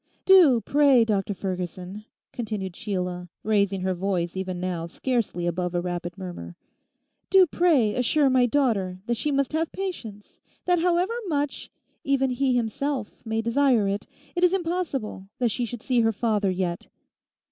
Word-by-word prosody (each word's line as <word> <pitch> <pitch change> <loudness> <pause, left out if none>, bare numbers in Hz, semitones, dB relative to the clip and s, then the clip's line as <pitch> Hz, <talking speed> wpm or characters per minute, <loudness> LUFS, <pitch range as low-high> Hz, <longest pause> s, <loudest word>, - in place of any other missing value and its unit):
Do, 340 -11 +7
pray, 275 -4 +4
Dr 205 -2 -1
Ferguson,' 185 +2 -5 0.3
continued 210 -6 -4
Sheila, 180 -4 -4
raising 200 -3 +1
her 185 0 0
voice 180 -2 -2
even 185 -1 -3
now 175 -2 -3
scarcely 225 -3 -2
above 175 +1 -2
a - - +2
rapid 175 0 -4
murmur—'do 185 - -2
pray 300 -11 +2
assure 275 +5 +2
my 255 -2 +4
daughter 220 -9 +1
that 235 - 0
she 235 +6 -2
must 275 0 0
have 320 +1 0
patience; 230 - -7 0.2
that 355 -1 +3
however 355 +4 +1
much 290 -3 -2 0.3
even 270 -1 +1
he 255 0 +1
himself 245 +1 -2
may 225 -1 -2
desire 235 -3 +3
it, 200 +1 -2 0.3
it 350 - 0
is 360 +1 +5
impossible 330 - -3
that 240 -3 +1
she 245 - -1
should 235 -1 -8
see 250 -3 +1
her 225 0 +3
father 210 -2 0
yet. 180 -2 -2
225 Hz, 150 wpm, -25 LUFS, 185-275 Hz, 0.3 s, Do